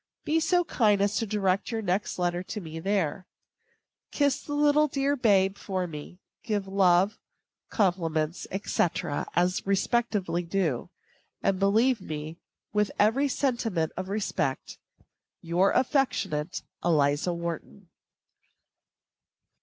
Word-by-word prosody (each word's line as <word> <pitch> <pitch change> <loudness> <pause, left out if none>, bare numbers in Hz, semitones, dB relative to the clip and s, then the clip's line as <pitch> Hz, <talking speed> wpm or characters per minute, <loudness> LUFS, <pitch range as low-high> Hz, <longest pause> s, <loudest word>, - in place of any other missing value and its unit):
Be 320 +2 +2
so 355 +2 +2
kind 215 - +2
as 200 0 +1
to 225 - -1
direct 195 -2 0
your 225 -2 -3
next 190 +1 -1
letter 175 -1 0
to 200 +3 -6
me 165 -3 -7
there. 185 -1 -1 0.8
Kiss 285 -2 +1
the 290 - -6
dear 295 - +2
little 300 +1 +4 0.3
babe 200 -6 +3
for 185 -2 -2
me. 155 +1 -8 0.2
Give 205 -3 -2
love, 190 +1 +3 0.5
compliments, 170 -5 0 0.2
&c., - - +2 0.5
as 180 +2 +1
respectively 200 -3 0
due; 170 -7 -1 0.5
and 190 -1 +1
believe 220 +4 +3
me, 155 -1 -6 0.3
with 210 -1 +2
every 225 +7 +3
sentiment 235 - 0
of 185 +1 -5
respect, 195 -9 -2 0.6
your 175 +4 +2
affectionate 245 - 0 0.2
ELIZA 150 +1 +2
WHARTON. 170 - -6
195 Hz, 115 wpm, -27 LUFS, 175-220 Hz, 0.8 s, little